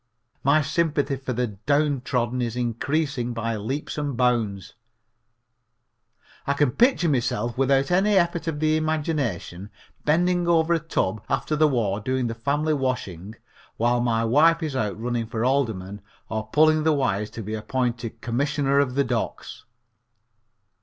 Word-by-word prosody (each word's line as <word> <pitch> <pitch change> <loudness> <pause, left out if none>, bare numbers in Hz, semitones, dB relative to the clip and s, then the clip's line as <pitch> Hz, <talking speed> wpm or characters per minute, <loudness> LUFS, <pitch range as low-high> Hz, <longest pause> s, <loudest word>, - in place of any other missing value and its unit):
My 150 +3 +4
sympathy 145 -3 0
for 130 -1 -5
the 125 +1 0
downtrodden 125 +1 0
is 120 -1 -2
increasing 125 +2 -1
by 115 0 -2
leaps 130 +9 -4
and 145 -4 -3
bounds. 110 -7 0 1.7
I 140 - +2
can 140 -2 +2
picture 240 - +3
myself 120 -4 0
without 135 +2 +2
any 200 +3 +3
effort 170 -2 +1
of 155 -2 -2
the 155 0 +2
imagination 145 - -2 0.3
bending 175 +3 +2
over 170 0 +3
a 165 - +2
tub 110 - -2
after 135 +3 0
the 155 0 +4
war 110 -8 0
doing 130 +3 -1
the 115 - -2
family 145 +6 0
washing 110 - -3 0.4
while 120 +1 +2
my 115 -1 +1
wife 160 +8 +4
is 150 -4 -3
out 110 -4 -2
running 120 -1 -2
for 115 +1 -2
alderman 110 -7 -1 0.3
or 110 0 -3
pulling 155 0 +4
the 160 0 +3
wires 105 -7 0
to 115 - -7
be 105 +2 -5
appointed 120 0 -3
Commissioner 140 +3 +1
of 130 -3 +1
the 140 - +3
Docks. 120 -3 -4
130 Hz, 145 wpm, -24 LUFS, 115-150 Hz, 1.7 s, My